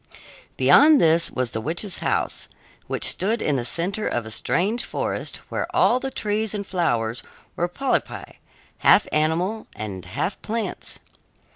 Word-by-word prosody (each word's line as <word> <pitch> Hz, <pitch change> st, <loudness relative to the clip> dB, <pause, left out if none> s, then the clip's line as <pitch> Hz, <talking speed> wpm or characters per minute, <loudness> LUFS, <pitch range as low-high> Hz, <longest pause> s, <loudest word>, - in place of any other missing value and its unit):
Beyond 300 Hz, 0 st, +7 dB
this 165 Hz, +1 st, +5 dB
was 125 Hz, -2 st, -2 dB
the 110 Hz, -, -3 dB
witch's 175 Hz, -, -2 dB
house, -, -, -1 dB, 0.4 s
which -, -, -2 dB
stood 220 Hz, +5 st, 0 dB
in 150 Hz, -, 0 dB
the 120 Hz, -, -2 dB
center 185 Hz, -, 0 dB
of 120 Hz, -2 st, -2 dB
a 110 Hz, -, -7 dB
strange 200 Hz, -, 0 dB
forest, -, -, -4 dB
where -, -, -2 dB
all 250 Hz, -, +4 dB
the 270 Hz, -, -3 dB
trees 215 Hz, -3 st, -2 dB
and 200 Hz, -1 st, -4 dB
flowers 120 Hz, -11 st, 0 dB, 0.3 s
were 175 Hz, -, 0 dB
polypi, 270 Hz, +9 st, -2 dB, 0.4 s
half -, -, +6 dB
animals 170 Hz, +8 st, 0 dB
and 100 Hz, -4 st, -6 dB
half 135 Hz, -, -3 dB
plants. 225 Hz, 0 st, -3 dB
175 Hz, 145 wpm, -23 LUFS, -, 0.4 s, Beyond